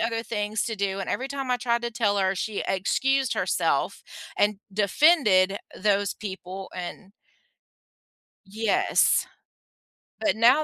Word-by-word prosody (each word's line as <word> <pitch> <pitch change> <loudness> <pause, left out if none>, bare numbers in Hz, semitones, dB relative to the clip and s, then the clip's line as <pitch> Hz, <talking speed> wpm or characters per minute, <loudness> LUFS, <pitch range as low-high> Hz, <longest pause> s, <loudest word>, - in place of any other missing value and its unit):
other 230 0 -1
things 210 -2 -2
to 225 - -3
do 195 0 -2
and 195 - -4
every 265 +2 -2
time 275 -2 -4
I 250 - +1
tried 235 -1 0
to 235 - -2
tell 215 -3 0
her, 190 0 +1
she 205 +2 -3
excused 265 +8 +1
herself - - 0 0.4
and 205 -1 +2
defended 200 - +4 0.2
those 200 -1 +1
people 190 -2 -7
and 185 +2 -7 1.3
Yes. 215 +2 +2 0.9
But 315 - +1
now 245 +7 +5
210 Hz, 130 wpm, -25 LUFS, 195-240 Hz, 1.3 s, now